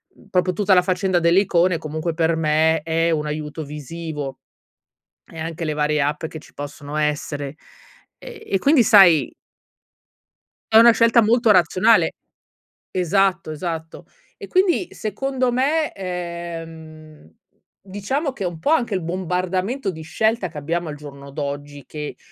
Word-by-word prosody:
uhm, - - -21
proprio 180 0 +1
tutta 200 +1 +2
la 180 - +6
faccenda 185 0 0
delle 170 +3 +4
icone 180 -2 +2
e, - - -1
comunque, 155 +2 -4
per 165 0 +1
me, 160 0 +2
è 165 +1 0
un 150 -1 -1
aiuto 150 +1 -5
visivo 150 -1 -6 0.9
e 165 - -13
anche 165 +1 -4
le 155 - -1
varie 150 0 0
app 150 +3 -1
che 160 - -9
ci - - -18
possono 145 +1 -7
essere 145 -1 -2 0.6
ehm, 475 -3 -10
e 195 - +3
quindi 280 +3 +4
sai 175 - +6 1.4
è 220 - +7
una 235 +1 +9
scelta 230 0 +4
molto 230 +1 +3
razionale 185 +4 +4 0.8
Esatto, 185 -1 +1
esatto. 160 +1 -6 0.3
E - - -10
quindi, 370 -1 +1
secondo 255 +4 -2
me, 290 +6 +1
ehm, 165 - -7 0.5
diciamo 205 - -3
che 205 - -6
è 180 - 0
un 165 -2 -7
po' 290 - 0
anche 235 -10 +1
il 185 - -1
bombardamento 185 +6 -2
di 160 -2 -9
scelta 210 +4 0
che 155 - -11
abbiamo 165 +3 -3
al 150 - -6
giorno 140 -1 -11
d'oggi 145 -1 -6
che, 150 -1 -7
170 Hz, 150 wpm, -21 LUFS, 155-195 Hz, 1.4 s, una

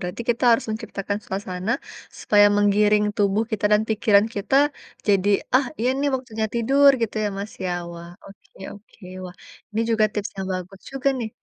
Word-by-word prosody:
berarti 180 +6 -5
kita 240 +2 -1
harus 230 - +2
menciptakan 205 -2 -4
suasana, 190 +2 -3 0.5
supaya 205 -1 +5
menggiring 210 +1 +3
tubuh 205 +1 +1
kita 215 -2 -3
dan 210 - +4
pikiran 215 -1 +3
kita, 205 +6 0 0.5
jadi, 200 -1 +2 0.3
"Ah, 260 +1 +4
iya 240 - 0
nih, 285 - +1
waktunya 235 -4 -3
tidur," 275 +5 +5
gitu 225 - -2
ya, - - +1
Mas, 200 +2 -6
ya? 185 - -1 0.2
Wah, 170 0 -10 0.2
oke 195 - -17 0.2
oke. 205 0 -18 0.2
Wah, 180 - -9 0.4
ini 220 +1 -2
juga 220 -1 +3
tips 210 -2 -3
yang 190 - -4
bagus 185 +1 -7
juga, 270 +1 -1
nih. 230 -3 -3
210 Hz, 175 wpm, -23 LUFS, 195-230 Hz, 0.5 s, supaya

